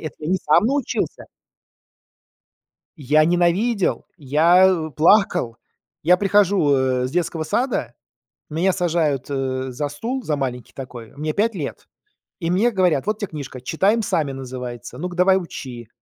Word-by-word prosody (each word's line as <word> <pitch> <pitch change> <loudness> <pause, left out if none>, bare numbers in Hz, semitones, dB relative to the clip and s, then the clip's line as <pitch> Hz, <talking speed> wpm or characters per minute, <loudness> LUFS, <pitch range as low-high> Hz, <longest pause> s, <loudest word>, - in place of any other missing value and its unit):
это 155 - -6
я 155 - -4
не 190 - +2
сам 150 +7 +5
научился. 280 +2 -2 1.8
Я 150 +3 +3
ненавидел, 175 +5 +1
я, 165 +5 +4
э, 165 -4 0
плакал. 155 - +3 0.5
Я 180 +4 +5
прихожу, 195 -6 +3
э, 130 -1 +1
с 130 - -7
детского 165 -2 -1
сада, 195 - -1 0.5
меня 170 +5 +1
сажают, 165 -7 0
э, 130 -1 -2
за 145 +4 -3
стул, 230 - -4
за 155 -9 -1
маленький 125 -4 -4
такой. 125 -4 -9
Мне 155 +2 -2
5 215 +4 0
лет. 145 -5 -6 0.5
И 165 -3 -2
мне 205 +7 +2
говорят: 180 - +1
"Вот 215 +1 -1
те 205 - -3
книжка" 140 -6 -8
Читаем 195 - +1
сами 155 -8 -1
"называется. 125 -2 -7
Ну-ка, 175 +4 -5
давай 185 +1 +4
учи". 130 - -7
160 Hz, 145 wpm, -21 LUFS, 135-190 Hz, 1.8 s, сам